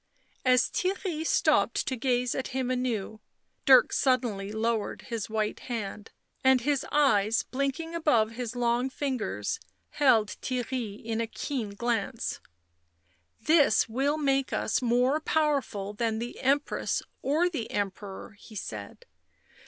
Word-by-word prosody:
As 255 Hz, -1 st, +4 dB
Theirry 365 Hz, -4 st, -2 dB
stopped -, -, +2 dB
to 260 Hz, -, -1 dB
gaze 250 Hz, 0 st, 0 dB
at 265 Hz, -, -3 dB
him 255 Hz, -1 st, 0 dB
anew, 235 Hz, -4 st, -2 dB, 0.5 s
Dirk 260 Hz, -2 st, +7 dB
suddenly 235 Hz, -7 st, +1 dB
lowered 220 Hz, 0 st, -1 dB
his 230 Hz, -4 st, -4 dB
white 215 Hz, -1 st, -1 dB
hand, 215 Hz, -3 st, -5 dB, 0.3 s
and 260 Hz, -1 st, +5 dB
his 285 Hz, +1 st, +1 dB
eyes, 225 Hz, -7 st, +3 dB
blinking 275 Hz, +5 st, -3 dB
above 270 Hz, -10 st, +2 dB
his 240 Hz, 0 st, -5 dB
long 245 Hz, +1 st, +1 dB
fingers, 270 Hz, -, -2 dB, 0.3 s
held 230 Hz, -7 st, +4 dB
Theirry 250 Hz, -4 st, -3 dB
in 225 Hz, 0 st, -2 dB
a 230 Hz, -, -1 dB
keen 225 Hz, -4 st, -4 dB
glance. 235 Hz, +1 st, -2 dB, 0.5 s
" 85 Hz, 0 st, -41 dB
This 295 Hz, -9 st, +5 dB
will 270 Hz, +6 st, 0 dB
make 275 Hz, -3 st, +1 dB
us -, -, 0 dB
more 250 Hz, +4 st, +2 dB
powerful 280 Hz, -11 st, 0 dB
than 225 Hz, +1 st, -1 dB
the 235 Hz, +2 st, -5 dB
Empress 280 Hz, +3 st, 0 dB, 0.2 s
or 310 Hz, +6 st, +2 dB
the 295 Hz, -11 st, -4 dB
Emperor," 200 Hz, 0 st, -4 dB
he 220 Hz, -, -14 dB
said. 105 Hz, -, -7 dB
245 Hz, 130 wpm, -28 LUFS, 220-275 Hz, 0.5 s, Dirk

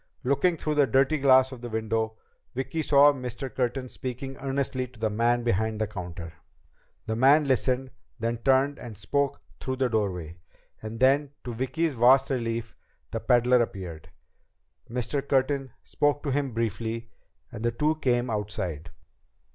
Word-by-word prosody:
Looking 160 Hz, +7 st, +2 dB
through 155 Hz, 0 st, -2 dB
the 145 Hz, -2 st, +4 dB
dirty 135 Hz, +4 st, +3 dB
glass 130 Hz, -1 st, +5 dB
of 130 Hz, -3 st, -9 dB
the 120 Hz, -, -6 dB
window, 110 Hz, 0 st, -1 dB, 0.4 s
Vicki 135 Hz, +5 st, -2 dB
saw 145 Hz, -1 st, +6 dB
Mr. 130 Hz, 0 st, -6 dB
Curtin 130 Hz, +1 st, -1 dB
speaking 130 Hz, +2 st, -6 dB
earnestly 135 Hz, -1 st, -2 dB
to 120 Hz, -2 st, -19 dB
the 110 Hz, -1 st, 0 dB
man 120 Hz, +3 st, +2 dB
behind 110 Hz, -1 st, 0 dB
the 110 Hz, -, +1 dB
counter. 90 Hz, -5 st, -7 dB, 0.7 s
The 110 Hz, -, -2 dB
man 140 Hz, +5 st, +5 dB
listened, 130 Hz, 0 st, +1 dB, 0.3 s
then 115 Hz, +1 st, -1 dB
turned 135 Hz, +4 st, +2 dB
and 110 Hz, -4 st, -9 dB
spoke 140 Hz, +7 st, -1 dB, 0.2 s
through 130 Hz, -, -3 dB
the 130 Hz, -1 st, +1 dB
doorway. 90 Hz, -7 st, -2 dB, 0.4 s
And 110 Hz, +1 st, -6 dB
then, 140 Hz, +2 st, +3 dB
to 120 Hz, -, -5 dB
Vicki's 145 Hz, +7 st, -1 dB
vast 130 Hz, +3 st, +5 dB
relief, 115 Hz, -3 st, -2 dB, 0.4 s
the -, -, -2 dB
peddler 125 Hz, 0 st, +4 dB
appeared. 85 Hz, -8 st, -5 dB, 0.8 s
Mr. 125 Hz, +4 st, -1 dB
Curtin 135 Hz, 0 st, 0 dB
spoke 145 Hz, 0 st, 0 dB
to 145 Hz, -, -1 dB
him 140 Hz, 0 st, 0 dB
briefly, 115 Hz, 0 st, -3 dB, 0.4 s
and 115 Hz, -1 st, -7 dB
the 120 Hz, -, +3 dB
two 150 Hz, +6 st, +1 dB
came 120 Hz, -4 st, +1 dB
outside. 90 Hz, -6 st, -3 dB
125 Hz, 155 wpm, -27 LUFS, 110-135 Hz, 0.8 s, saw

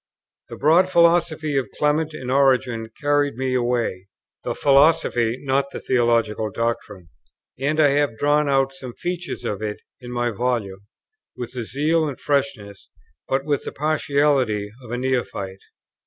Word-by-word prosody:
The -, -, -7 dB
broad 170 Hz, +6 st, +4 dB
philosophy 170 Hz, -3 st, +3 dB
of 125 Hz, -6 st, -5 dB
Clement 150 Hz, +1 st, +1 dB
and 130 Hz, -3 st, -5 dB
Origen 130 Hz, -4 st, +2 dB
carried 145 Hz, -2 st, +1 dB
me 130 Hz, +1 st, -2 dB
away; 120 Hz, -6 st, -1 dB, 0.4 s
the -, -, -3 dB
philosophy, 135 Hz, -5 st, +3 dB
not 135 Hz, +1 st, +1 dB
the -, -, -7 dB
theological 115 Hz, -3 st, +1 dB
doctrine; 105 Hz, -5 st, -4 dB, 0.5 s
and 145 Hz, +3 st, 0 dB
I 150 Hz, -2 st, +6 dB
have 140 Hz, -5 st, +1 dB
drawn 145 Hz, +2 st, +2 dB
out 135 Hz, -1 st, +2 dB
some 130 Hz, -2 st, -8 dB
features 180 Hz, 0 st, -4 dB
of 105 Hz, 0 st, -3 dB
it 105 Hz, -1 st, -4 dB, 0.2 s
in 125 Hz, -1 st, -9 dB
my 120 Hz, 0 st, -1 dB
volume, 105 Hz, -4 st, -2 dB, 0.5 s
with 120 Hz, 0 st, -6 dB
the 120 Hz, -3 st, -4 dB
zeal 155 Hz, +6 st, +1 dB
and 140 Hz, -, -6 dB
freshness, 130 Hz, -9 st, -2 dB, 0.4 s
but 135 Hz, +1 st, 0 dB
with 145 Hz, -2 st, 0 dB
the -, -, -5 dB
partiality, 140 Hz, -8 st, +1 dB
of 120 Hz, -, -12 dB
a 120 Hz, -, -3 dB
neophyte. 120 Hz, -7 st, -2 dB
130 Hz, 150 wpm, -22 LUFS, 115-145 Hz, 0.5 s, I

